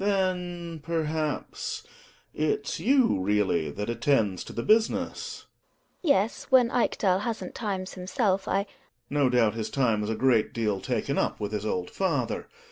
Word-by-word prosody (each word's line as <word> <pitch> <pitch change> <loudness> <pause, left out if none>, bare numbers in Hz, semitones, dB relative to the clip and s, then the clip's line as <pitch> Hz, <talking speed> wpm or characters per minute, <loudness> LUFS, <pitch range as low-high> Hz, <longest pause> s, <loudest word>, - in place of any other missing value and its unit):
Gregers. 200 0 +2
Then, 175 -3 -2
perhaps, 155 -1 -2 0.5
it's 150 -2 -1
you 260 - +3
really 95 -5 +1
that 100 +8 -4
attend 115 -5 +1
to - - -7
the 115 - -3
business? 220 +1 +1 0.6
GiNA. 335 - 0
Yes, 205 +4 -1
when 250 -3 +5
Ekdal 190 -5 +2
hasn't 225 +2 -4
times 190 -4 -3
himself, 190 +1 0
I 195 - +1
Gregers. 200 - -22 0.4
No 145 -2 +3
doubt, 120 -4 +3
his 110 -1 -3
time's 110 -6 +1
a 110 - 0
great 120 -2 +2
deal 105 -4 -1
taken - - -1
up - - 0
with 105 0 -3
his 105 0 -2
old 90 -4 -2
father. 145 -11 -1
150 Hz, 155 wpm, -27 LUFS, -, 0.6 s, when